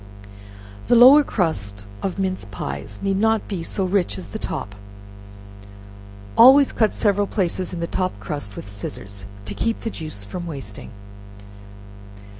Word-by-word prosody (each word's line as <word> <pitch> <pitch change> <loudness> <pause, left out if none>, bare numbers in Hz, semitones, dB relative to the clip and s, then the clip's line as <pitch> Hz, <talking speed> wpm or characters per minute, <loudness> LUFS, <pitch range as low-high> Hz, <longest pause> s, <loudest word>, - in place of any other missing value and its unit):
The - - +5
lower 260 +5 +9
crust 100 - -2 0.2
of 195 - -3
mince 185 - -2
pies 95 +2 -6
need 195 -1 +1
not 220 +1 +2
be 190 -5 -4
so 190 +3 -1
rich 180 - 0
as 90 - -7
the - - -6
top; 100 - -5 1.6
always 265 +4 +8
cut 220 -2 +2
several 205 -1 +2
places 185 -2 -1
in 175 -2 -5
the - - 0
top 185 +2 -2
crust 145 - -5
with - - -8
scissors, 100 -1 -6 0.2
to 105 - -5
keep 230 - -2
the 225 - -3
juice 155 - -7
from 175 - -6
wasting. 135 -10 -7
175 Hz, 145 wpm, -22 LUFS, -, 1.6 s, lower